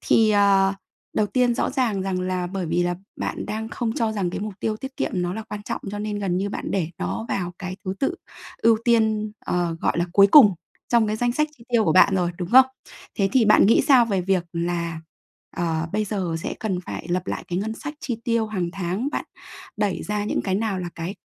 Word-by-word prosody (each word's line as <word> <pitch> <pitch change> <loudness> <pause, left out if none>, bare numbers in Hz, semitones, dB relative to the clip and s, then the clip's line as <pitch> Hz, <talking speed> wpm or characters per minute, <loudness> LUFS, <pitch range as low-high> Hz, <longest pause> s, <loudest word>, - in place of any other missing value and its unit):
thì, 220 -1 +4
ờ, 200 -1 +4 0.4
đầu 210 - +3
tiên 245 +3 +2
rõ - - 0
ràng 245 -8 0
rằng 190 -1 -2
là 185 -1 -2
bởi 185 0 -4
vì 170 +2 +1
là 175 0 0 0.3
bạn - - -3
đang 220 +1 -4
không 230 -1 -2
cho 225 -4 0
rằng 195 -4 -1
cái - - -4
mục 210 -1 -5
tiêu 215 -1 -1
tiết 265 +4 -8
kiệm - - -1
nó 180 -1 -1
là 220 - -4
quan 210 -1 -7
trọng, - - -4
cho 205 - -5
nên 210 0 -3
gần 190 -3 -1
như 195 +2 -1
bạn - - -5
để 180 -5 0
nó 95 +5 -3
vào 180 -2 -2
cái 185 -1 -5
thứ 190 0 -2
tự 315 +6 +1 0.5
ưu 230 -1 +5
tiên, 220 -3 +2
ờ, 175 -2 0
gọi - - 0
là, 170 - +2
cuối 200 -1 +7
cùng 210 -4 +8 0.3
trong 235 -2 +3
cái 215 - -1
danh 240 +2 0
sách 305 +4 +1
chi 230 - -17
tiêu 235 -3 +3
của 160 - +3
bạn 185 +2 +6
rồi, 180 -2 +1
đúng 175 -2 -4
không? 260 +1 +8 0.5
Thế 195 -1 +1
thì 255 -3 +4
bạn 210 -2 +6
nghĩ 225 - +5
sao 260 -4 +7
về 200 -5 0
việc 185 -1 +1
là, 170 -1 -2 0.6
ờ, 165 -2 -1
bây 215 +1 0
giờ 190 -5 -2
sẽ - - -4
cần 190 -5 -1
phải 175 - -7
lập 180 +1 -1
lại - - -4
cái 175 - -1
ngân 220 +3 -3
sách 295 +6 -7
chi 245 -6 -3
tiêu 230 -3 +1
hàng 185 -5 -2
tháng? 190 +7 -2
Bạn - - -2 0.5
đẩy 205 -3 -1
ra 210 0 -2
những - - -1
cái 190 - -1
nào 205 -1 -1
là 180 -1 -4
cái 170 +4 -5
200 Hz, 240 wpm, -23 LUFS, 180-220 Hz, 0.6 s, cùng